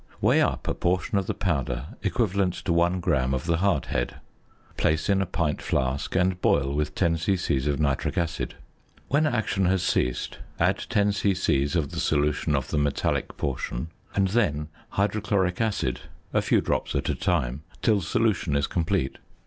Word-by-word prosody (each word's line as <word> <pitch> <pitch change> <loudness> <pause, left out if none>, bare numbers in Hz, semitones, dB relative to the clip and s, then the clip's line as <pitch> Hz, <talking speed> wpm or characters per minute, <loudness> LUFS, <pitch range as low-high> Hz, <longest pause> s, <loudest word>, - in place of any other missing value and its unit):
Weigh - - +4
up - - 0
a - - +1
portion 90 +3 0
of 95 - -4
the - - -1
powder 75 -6 -1
equivalent 95 -1 +1
to 85 - -1
1 85 +2 +2
gram 65 -5 +1
of 65 - -4
the 85 -1 +2
hardhead, 90 -9 0 0.6
place 80 +4 +1
in 100 -1 +3
a 95 - -1
pint 85 -4 -1
flask, 65 +5 -1
and 90 0 +2
boil 70 0 +2
with 75 +1 -1
10 85 -3 +2
c.c. 80 -6 0
of 70 - 0
nitric 70 -3 0
acid. 85 -2 -2 0.5
When 150 +3 +3
action 110 -7 0
has 95 -1 +2
ceased 60 -7 0 0.2
add - - +2
10 100 -1 +3
c.c. 95 -8 +1
of 75 -4 -1
the - - -4
solution 75 +1 +1
of 65 -2 -2
the 75 - +1
metallic 70 -1 -1
portion 65 +2 -3 0.3
and 95 -1 +2
then 80 -9 +1 0.2
hydrochloric 100 -2 0
acid 105 - 0 0.3
(a - - +3
few - - +3
drops - - -1
at - - 0
a - - +1
time) 75 -9 0 0.2
till 105 -3 +3
solution 90 -2 +1
is 70 0 +2
complete. 80 -6 -1
85 Hz, 170 wpm, -26 LUFS, 70-95 Hz, 0.6 s, Weigh